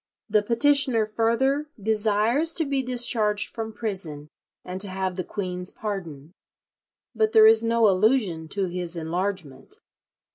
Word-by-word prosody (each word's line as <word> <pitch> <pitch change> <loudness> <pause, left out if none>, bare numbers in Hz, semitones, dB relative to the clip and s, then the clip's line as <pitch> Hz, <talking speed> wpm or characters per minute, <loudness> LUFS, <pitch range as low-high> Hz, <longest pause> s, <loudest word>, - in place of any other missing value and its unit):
The 210 -1 +3
petitioner 240 +1 +3
further 250 +7 0
"desires 220 +8 +1
to 325 - +1
be 275 -1 0
discharged 235 -4 0
from 225 -1 -5
prison, 180 -10 -5 0.4
and 185 +1 -3
to 205 - -1
have 190 -1 -3
the 185 - -3
queen's 180 -2 -5
pardon," 170 -7 -6 0.8
but 220 -1 +1
there 220 -1 +8
is 220 +1 +6
no 230 -1 +3
allusion 195 -4 +1
to 195 +4 -2
his 175 -1 -4
enlargement. 170 -2 -4
210 Hz, 135 wpm, -24 LUFS, 185-230 Hz, 0.8 s, there